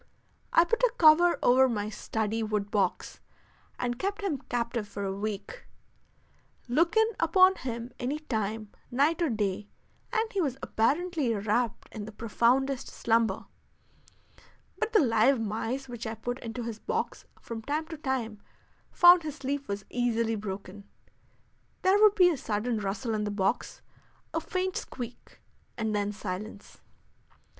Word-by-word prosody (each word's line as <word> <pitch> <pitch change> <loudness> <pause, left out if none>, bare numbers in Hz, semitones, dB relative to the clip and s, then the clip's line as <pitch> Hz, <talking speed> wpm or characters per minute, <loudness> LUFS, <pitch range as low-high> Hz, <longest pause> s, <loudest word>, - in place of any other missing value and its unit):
I 335 - +6
put 460 +8 0
a - - +4
cover 340 +2 +6
over 260 +1 +5
my 210 -3 -2
study 220 0 -2
wood 210 -2 -2
box 205 -2 -1 0.6
and 245 0 -2
kept 405 +2 -2
him 320 -9 -1
captive 235 -2 -2
for 200 0 -6
a 195 -1 -2
week. 215 - -5 1.0
Look 330 - +2
in 445 - +6
upon 370 +3 +5
him 235 -1 -5
any 265 +5 -1
time, 220 -7 -3 0.2
night 295 +7 +2
or 335 - +2
day, 205 -3 -1 0.4
and 445 -1 0
he 395 - +1
was 270 -6 -1
apparently 295 +3 +1
wrapped 215 +3 -1
in 215 -2 -6
the 220 - -8
profoundest 245 +5 +1
slumber; 225 -3 0 1.3
but 450 - -1
the 440 - +5
live 235 +3 +4
mice 225 +5 -3
which 240 -2 -6
I 220 - -4
put 245 +4 -4
into 230 +1 -5
his 225 -2 -5
box - - -3
from 230 -1 -7
time 295 +6 -2
to 325 - -6
time 240 -7 -3 0.5
found 350 0 +8
his 305 -3 -5
sleep 280 0 -3
was 200 0 -4
easily 230 -2 +1
broken; 200 -1 -7 0.9
there 390 +3 +4
would 425 -1 +7
be 360 -3 +6
a 315 - -2
sudden 220 0 -1
rustle 210 +4 -2
in 215 -1 -1
the 210 - -2
box, 200 +3 -1 0.5
a 325 - 0
faint 370 +3 -2
squeak, 245 -2 -8 0.4
and 220 -2 -1
then 205 0 0
silence. 205 0 -7
240 Hz, 150 wpm, -29 LUFS, 215-305 Hz, 1.3 s, found